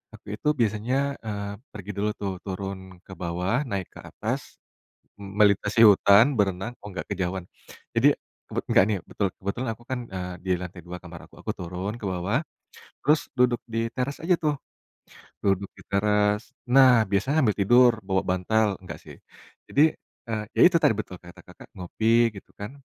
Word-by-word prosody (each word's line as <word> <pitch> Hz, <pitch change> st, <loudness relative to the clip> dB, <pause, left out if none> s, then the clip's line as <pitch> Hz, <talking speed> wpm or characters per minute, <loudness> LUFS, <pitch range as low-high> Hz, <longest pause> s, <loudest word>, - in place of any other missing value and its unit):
aku -, -, -19 dB
itu 150 Hz, -, -6 dB
biasanya, 110 Hz, +3 st, +1 dB, 0.3 s
eee, 100 Hz, -1 st, -4 dB, 0.2 s
pergi 105 Hz, 0 st, -7 dB
dulu 105 Hz, +1 st, +1 dB
tuh, 100 Hz, -2 st, -2 dB
turun 95 Hz, 0 st, -5 dB, 0.2 s
ke -, -, -14 dB
bawah, 90 Hz, +5 st, -1 dB
naik 100 Hz, -4 st, -3 dB
ke -, -, -12 dB
atas, -, -, -5 dB, 0.6 s
melintasi 100 Hz, +2 st, +2 dB
hutan, 105 Hz, +6 st, +6 dB
berenang 95 Hz, +3 st, 0 dB
oh 105 Hz, -, -7 dB
nggak 85 Hz, -3 st, -5 dB
kejauhan. 90 Hz, -1 st, -3 dB, 0.5 s
Jadi -, -, +6 dB, 0.4 s
bet -, -, 0 dB
nggak -, -, +6 dB
nih, 105 Hz, -2 st, 0 dB
betul 100 Hz, -, 0 dB
kebetulan 115 Hz, +6 st, -2 dB
aku 120 Hz, +2 st, -17 dB
kan, 130 Hz, -1 st, -1 dB, 0.2 s
eee, 90 Hz, 0 st, -4 dB
di 95 Hz, -, 0 dB
lantai 90 Hz, 0 st, -7 dB
2 90 Hz, 0 st, -6 dB
kamar 85 Hz, -2 st, -11 dB
aku, -, -, -20 dB
aku -, -, -2 dB
turun 90 Hz, +5 st, -4 dB
ke 105 Hz, -, -7 dB
bawah, 95 Hz, -, -1 dB, 0.6 s
terus 150 Hz, +2 st, +3 dB
duduk 125 Hz, -1 st, +3 dB
di 115 Hz, 0 st, -2 dB
teras 135 Hz, +2 st, -2 dB
aja 180 Hz, +2 st, +3 dB
tuh, 150 Hz, -2 st, +1 dB, 0.8 s
duduk 100 Hz, 0 st, +1 dB
di -, -, -13 dB
teras. 105 Hz, +3 st, +1 dB, 0.2 s
Nah 130 Hz, 0 st, +7 dB, 0.2 s
biasa 100 Hz, +9 st, +1 dB
ambil 110 Hz, -5 st, +2 dB
tidur 120 Hz, +5 st, +6 dB
bawa 95 Hz, -1 st, +1 dB
bantal, 105 Hz, +4 st, +1 dB
enggak 90 Hz, -, -8 dB
sih, -, -, -13 dB, 0.5 s
jadi, 145 Hz, -, +4 dB, 0.5 s
eee, 110 Hz, -1 st, -1 dB
ya -, -, +3 dB
itu 170 Hz, -, +3 dB
tadi -, -, +5 dB
betul 90 Hz, -3 st, -6 dB
kata 85 Hz, 0 st, -14 dB
Kakak, -, -, -15 dB
ngopi 115 Hz, +6 st, +2 dB
gitu -, -, -13 dB
kan, 105 Hz, +4 st, -5 dB
100 Hz, 170 wpm, -26 LUFS, 95-115 Hz, 0.8 s, Nah